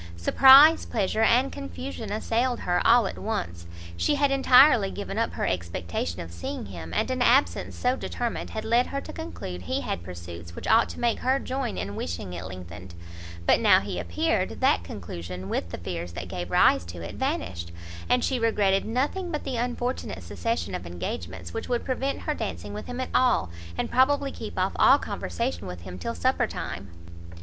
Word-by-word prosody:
Surprise, 275 Hz, -, +8 dB
pleasure 215 Hz, 0 st, -1 dB
and 245 Hz, +4 st, +4 dB
confusion 90 Hz, -, -6 dB
assailed 235 Hz, +3 st, 0 dB
her 175 Hz, 0 st, +1 dB
all 235 Hz, -1 st, +6 dB
at -, -, -5 dB
once; 85 Hz, -, -4 dB, 0.3 s
she 290 Hz, -, +1 dB
had 285 Hz, -1 st, +2 dB
entirely 260 Hz, -5 st, +6 dB
given 200 Hz, +1 st, -4 dB
up 230 Hz, -, 0 dB
her -, -, -2 dB
expectation 85 Hz, -1 st, -3 dB
of 85 Hz, -, -8 dB
seeing 85 Hz, +4 st, -5 dB
him, 85 Hz, -4 st, -8 dB
and 85 Hz, -, 0 dB
an 255 Hz, -1 st, -2 dB
absence 250 Hz, +3 st, +3 dB
so 250 Hz, +1 st, +1 dB
determined 240 Hz, -2 st, -4 dB
had 220 Hz, -, -5 dB
led 235 Hz, +2 st, +3 dB
her 275 Hz, -, -3 dB
to -, -, -9 dB
conclude 85 Hz, +2 st, -6 dB
he 90 Hz, -, -2 dB
had -, -, -3 dB
pursuits 85 Hz, -1 st, -9 dB
which -, -, -7 dB
ought 225 Hz, +1 st, +5 dB
to -, -, -8 dB
make 235 Hz, -1 st, +1 dB
her 260 Hz, +2 st, +2 dB
join 260 Hz, -3 st, -3 dB
in 100 Hz, +2 st, -4 dB
wishing 85 Hz, +1 st, -4 dB
it 90 Hz, -1 st, -5 dB
lengthened; 90 Hz, 0 st, -9 dB, 0.5 s
but -, -, +5 dB
now -, -, +6 dB
he 90 Hz, -, -4 dB
appeared, 85 Hz, 0 st, -1 dB
that -, -, +3 dB
conclusion, 90 Hz, +1 st, -7 dB
with 85 Hz, -, -2 dB
the -, -, -6 dB
fears 85 Hz, -1 st, -5 dB
that 90 Hz, +1 st, -6 dB
gave 90 Hz, 0 st, -5 dB
rise 90 Hz, -, +4 dB
to 85 Hz, +1 st, -9 dB
it, 85 Hz, +1 st, -6 dB
vanished; 85 Hz, -3 st, -3 dB, 0.4 s
and 250 Hz, -1 st, +3 dB
she 260 Hz, -2 st, 0 dB
regretted 205 Hz, -4 st, +2 dB
nothing 285 Hz, -, -1 dB
but 300 Hz, -, -3 dB
the 265 Hz, -3 st, -3 dB
unfortunate 245 Hz, +1 st, -3 dB
succession 230 Hz, 0 st, -3 dB
of 90 Hz, -, -5 dB
engagements 85 Hz, 0 st, -6 dB
which -, -, -5 dB
would 240 Hz, -1 st, -1 dB
prevent 270 Hz, +1 st, -2 dB
her -, -, -1 dB
dancing -, -, -5 dB
with -, -, -7 dB
him 245 Hz, +1 st, -5 dB
at 255 Hz, -, -3 dB
all, 245 Hz, -, +3 dB, 0.3 s
and -, -, -2 dB
probably 275 Hz, +2 st, +3 dB
keep -, -, -8 dB
off -, -, +1 dB
all -, -, +7 dB
conversation 240 Hz, +3 st, -3 dB
with 90 Hz, -1 st, -7 dB
him 90 Hz, +1 st, -8 dB
till 85 Hz, -, -4 dB
supper -, -, +1 dB
time. 95 Hz, +1 st, -6 dB
175 Hz, 190 wpm, -26 LUFS, -, 0.5 s, Surprise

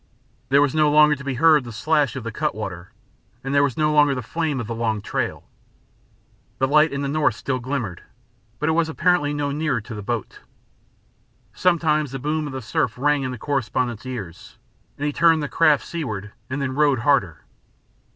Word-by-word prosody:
There 140 Hz, +2 st, +5 dB
was 145 Hz, -, 0 dB
no 155 Hz, -1 st, +3 dB
longer 150 Hz, 0 st, +6 dB
to 140 Hz, -, -10 dB
be 135 Hz, -2 st, -3 dB
heard 155 Hz, +1 st, +5 dB
the 120 Hz, -, -8 dB
slash 145 Hz, +6 st, +1 dB
of 130 Hz, -, -5 dB
the 115 Hz, -, -4 dB
cut -, -, -2 dB
water, 90 Hz, -5 st, -6 dB, 0.5 s
and 135 Hz, +1 st, -3 dB
there 140 Hz, -, +4 dB
was 140 Hz, -4 st, 0 dB
no 150 Hz, 0 st, +2 dB
longer 145 Hz, -2 st, +4 dB
the 125 Hz, -, -4 dB
flame 155 Hz, +1 st, -2 dB
of 120 Hz, -, -3 dB
the 115 Hz, -, -4 dB
long 115 Hz, -2 st, -1 dB
trail. -, -, -4 dB, 1.1 s
The 130 Hz, -, +1 dB
light 150 Hz, +3 st, +4 dB
in 140 Hz, 0 st, -3 dB
the -, -, -1 dB
north 145 Hz, -5 st, +1 dB
still 130 Hz, +3 st, -3 dB
glimmered, 120 Hz, -8 st, -4 dB, 0.6 s
but 150 Hz, -, -2 dB
it -, -, +3 dB
was 160 Hz, 0 st, +1 dB
apparently 170 Hz, -3 st, +1 dB
no 145 Hz, -1 st, -2 dB
nearer 150 Hz, -3 st, -1 dB
to 110 Hz, +2 st, -9 dB
the 105 Hz, -, -6 dB
boat. 115 Hz, +1 st, -4 dB, 1.1 s
Sometimes 155 Hz, -5 st, +1 dB
the -, -, -2 dB
boom 150 Hz, +3 st, -2 dB
of 140 Hz, -, -7 dB
the 130 Hz, -2 st, -5 dB
surf 110 Hz, +1 st, -1 dB
rang 145 Hz, +2 st, +2 dB
in 130 Hz, -, -2 dB
the 125 Hz, -, -5 dB
correspondent's 130 Hz, -3 st, -2 dB
ears, 100 Hz, -10 st, -8 dB, 0.4 s
and 145 Hz, -, -3 dB
he 145 Hz, -, -1 dB
turned 165 Hz, -1 st, +4 dB
the -, -, -2 dB
craft 150 Hz, -2 st, +3 dB
seaward 110 Hz, -, -5 dB, 0.2 s
then 140 Hz, +2 st, -3 dB
and 130 Hz, -1 st, -3 dB
rowed 145 Hz, -5 st, +3 dB
harder. 115 Hz, -, +1 dB
140 Hz, 200 wpm, -22 LUFS, 120-150 Hz, 1.1 s, longer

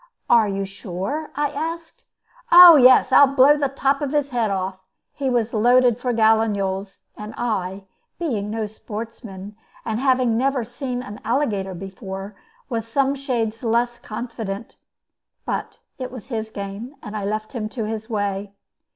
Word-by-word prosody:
"Are 230 Hz, -3 st, +6 dB
you 195 Hz, 0 st, -2 dB
sure?" 195 Hz, -, -5 dB
I 290 Hz, 0 st, 0 dB
asked. 325 Hz, +3 st, -6 dB, 0.5 s
"Oh 350 Hz, -1 st, +11 dB
yes, 255 Hz, -1 st, +6 dB
I'll 285 Hz, +1 st, +8 dB
blow 280 Hz, +2 st, +7 dB
the 285 Hz, -2 st, 0 dB
top 275 Hz, +1 st, 0 dB
of 290 Hz, 0 st, -2 dB
his 290 Hz, -1 st, 0 dB
head 235 Hz, -3 st, 0 dB
off." 190 Hz, -1 st, -3 dB, 0.3 s
He 275 Hz, -2 st, -2 dB
was 240 Hz, -2 st, 0 dB
loaded 245 Hz, +1 st, +4 dB
for 245 Hz, 0 st, -1 dB
gallinules, 210 Hz, -4 st, +1 dB
and 210 Hz, +1 st, -8 dB
I, 195 Hz, -5 st, -2 dB, 0.3 s
being 230 Hz, -12 st, -2 dB
no 220 Hz, 0 st, -2 dB
sportsman, 210 Hz, -2 st, -8 dB, 0.3 s
and 220 Hz, 0 st, -2 dB
never 260 Hz, 0 st, +2 dB
having -, -, -3 dB
seen 250 Hz, +2 st, -5 dB
an 210 Hz, -4 st, -9 dB
alligator 215 Hz, -6 st, -1 dB
before, 195 Hz, +2 st, -7 dB, 0.3 s
was 230 Hz, -4 st, -3 dB
some 275 Hz, +3 st, +1 dB
shades 235 Hz, -5 st, -2 dB
less 240 Hz, +1 st, 0 dB
confident. 225 Hz, -2 st, -6 dB, 0.7 s
But -, -, -4 dB, 0.2 s
it 255 Hz, -1 st, -5 dB
was 250 Hz, -1 st, -10 dB
his 220 Hz, -3 st, -3 dB
game, 205 Hz, +6 st, -7 dB
and 210 Hz, -1 st, -7 dB
I 210 Hz, -, -3 dB
left 215 Hz, +3 st, -3 dB
him 215 Hz, -4 st, -3 dB
to 225 Hz, +1 st, -4 dB
his 220 Hz, +1 st, -5 dB
way. 200 Hz, -2 st, -3 dB
225 Hz, 155 wpm, -22 LUFS, 205-260 Hz, 0.7 s, Oh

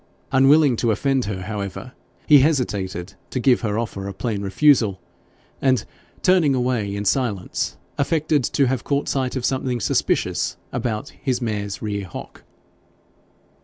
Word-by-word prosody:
Unwilling 135 Hz, 0 st, +5 dB
to 120 Hz, -, +1 dB
offend 135 Hz, +3 st, +1 dB
her, 100 Hz, -2 st, -4 dB
however, 105 Hz, +3 st, -5 dB, 0.3 s
he 145 Hz, -2 st, +7 dB
hesitated 100 Hz, -, 0 dB, 0.2 s
to 130 Hz, -, -2 dB
give 125 Hz, 0 st, +3 dB
her 105 Hz, -2 st, -1 dB
offer 100 Hz, -4 st, -3 dB
a 100 Hz, -, -5 dB
plain 110 Hz, -3 st, -2 dB
refusal, 100 Hz, -1 st, +3 dB, 0.6 s
and 130 Hz, -4 st, +2 dB, 0.4 s
turning 180 Hz, -7 st, +4 dB
away 120 Hz, -5 st, 0 dB
in 100 Hz, 0 st, -3 dB
silence, 105 Hz, -4 st, -1 dB, 0.2 s
affected 150 Hz, -1 st, +1 dB
to 135 Hz, +4 st, +2 dB
have 130 Hz, -1 st, -1 dB
caught 140 Hz, 0 st, -1 dB
sight 130 Hz, -2 st, -1 dB
of 130 Hz, -2 st, -2 dB
something 130 Hz, -2 st, -1 dB
suspicious 85 Hz, -, 0 dB, 0.2 s
about 120 Hz, +1 st, -2 dB
his 130 Hz, -4 st, -2 dB
mare's 105 Hz, -5 st, -3 dB
near 100 Hz, -2 st, -3 dB
hock. 85 Hz, -, -9 dB
120 Hz, 140 wpm, -22 LUFS, 100-135 Hz, 0.6 s, he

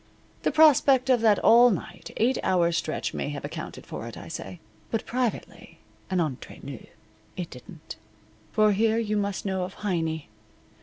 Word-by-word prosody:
The -, -, +1 dB
prospect 275 Hz, -4 st, +5 dB
of 245 Hz, -3 st, +3 dB
that 215 Hz, -3 st, +5 dB
all 240 Hz, +2 st, +7 dB
night, 200 Hz, -, -5 dB
eight 245 Hz, +3 st, +2 dB
hour 175 Hz, -2 st, +2 dB
stretch 170 Hz, -1 st, -2 dB
may -, -, -3 dB
have 145 Hz, -1 st, -5 dB
accounted -, -, -7 dB
for -, -, -7 dB
it, -, -, -9 dB
I -, -, -9 dB
say. 95 Hz, -2 st, -7 dB, 0.3 s
But 225 Hz, -, -2 dB
privately, 245 Hz, -2 st, -3 dB, 0.3 s
and 185 Hz, -1 st, 0 dB
entre 150 Hz, -7 st, -3 dB
nous, 135 Hz, -3 st, -8 dB, 0.5 s
it 180 Hz, -2 st, -5 dB
didn't. 150 Hz, -, -11 dB, 0.5 s
For 215 Hz, 0 st, +4 dB
here 220 Hz, +2 st, +2 dB
you 215 Hz, -2 st, -1 dB
must 200 Hz, -1 st, -2 dB
know 190 Hz, -1 st, -1 dB
of 180 Hz, +1 st, -5 dB
Heiny. 160 Hz, -, -1 dB
200 Hz, 165 wpm, -26 LUFS, 170-230 Hz, 0.5 s, all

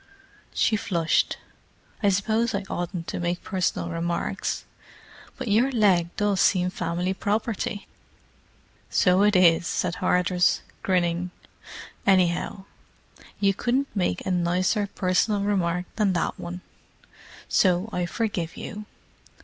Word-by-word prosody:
She 215 Hz, -, +2 dB
flushed. 170 Hz, -5 st, +1 dB, 0.6 s
"I 205 Hz, -, +4 dB
suppose 215 Hz, +4 st, +1 dB
I 200 Hz, -, -2 dB
oughtn't 175 Hz, -1 st, -3 dB
to -, -, -3 dB
make 175 Hz, 0 st, -2 dB
personal 185 Hz, -3 st, -1 dB
remarks, 170 Hz, +1 st, -2 dB, 0.7 s
but -, -, -5 dB
your 230 Hz, +6 st, +3 dB
leg 195 Hz, -8 st, +3 dB
does 205 Hz, -2 st, +1 dB
seem 180 Hz, -2 st, +3 dB
family 175 Hz, +1 st, -2 dB
property!" 210 Hz, +1 st, -2 dB, 1.0 s
"So 180 Hz, +1 st, +3 dB
it 210 Hz, 0 st, +4 dB
is," 170 Hz, -2 st, +5 dB
said 180 Hz, -1 st, -1 dB
Hardress, 180 Hz, 0 st, +2 dB, 0.2 s
grinning. 180 Hz, -1 st, 0 dB, 0.8 s
"Anyhow, 190 Hz, +1 st, +2 dB, 0.7 s
you 195 Hz, -1 st, +3 dB
couldn't 250 Hz, +7 st, -1 dB
make 180 Hz, -, -1 dB
a -, -, -1 dB
nicer 180 Hz, +4 st, +1 dB
personal 195 Hz, +3 st, +1 dB
remark 180 Hz, -3 st, 0 dB
than 205 Hz, -4 st, +2 dB
that 175 Hz, -, -1 dB
one. 175 Hz, +1 st, -6 dB, 0.9 s
So 180 Hz, +1 st, +3 dB
I 180 Hz, -1 st, -1 dB
forgive 185 Hz, -6 st, -3 dB
you. 210 Hz, -1 st, -7 dB
185 Hz, 115 wpm, -25 LUFS, 175-205 Hz, 1.0 s, is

